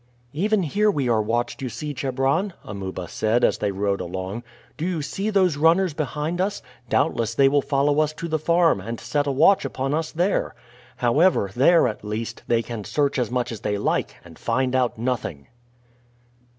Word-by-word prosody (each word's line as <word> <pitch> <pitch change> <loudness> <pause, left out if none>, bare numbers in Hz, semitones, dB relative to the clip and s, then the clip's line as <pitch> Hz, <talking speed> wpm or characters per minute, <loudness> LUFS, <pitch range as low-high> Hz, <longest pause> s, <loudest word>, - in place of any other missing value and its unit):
"Even 200 +5 +1
here 210 +7 +2
we 140 -10 0
are 115 -2 +3
watched, 120 +5 -2
you 130 - -3
see, 145 +6 -5
Chebron," 135 +8 0
Amuba 95 -3 -6
said 110 +7 0
as - - +3
they 105 - 0
rode 100 0 -1
along. 95 +5 -5 0.3
"Do 155 - -6
you 170 -4 -1
see 195 +8 -3
those 185 -7 +2
runners 165 +3 +3
behind 155 +3 -2
us? 205 +2 -2 0.3
Doubtless 115 0 +1
they 135 +2 +5
will 145 +1 +3
follow 145 +2 +1
us 155 -1 +2
to 165 +2 -6
the 160 -1 -1
farm, 170 - +3
and 115 +4 -5
set 145 +5 -1
a - - +1
watch 160 +9 +4
upon 135 0 -2
us 160 0 -1
there. 180 +5 0 0.4
However, 125 - +3
there, 160 +4 +5
at 110 - -5
least, 110 +2 -4
they 115 -1 +2
can 115 -2 -6
search 140 +4 0
as 120 - 0
much 125 0 -1
as 115 - -6
they 105 -1 -2
like, 100 - -1
and 85 -2 -14
find 130 +2 0
out 125 -2 +1
nothing." 115 - -3
135 Hz, 190 wpm, -23 LUFS, 115-160 Hz, 0.4 s, they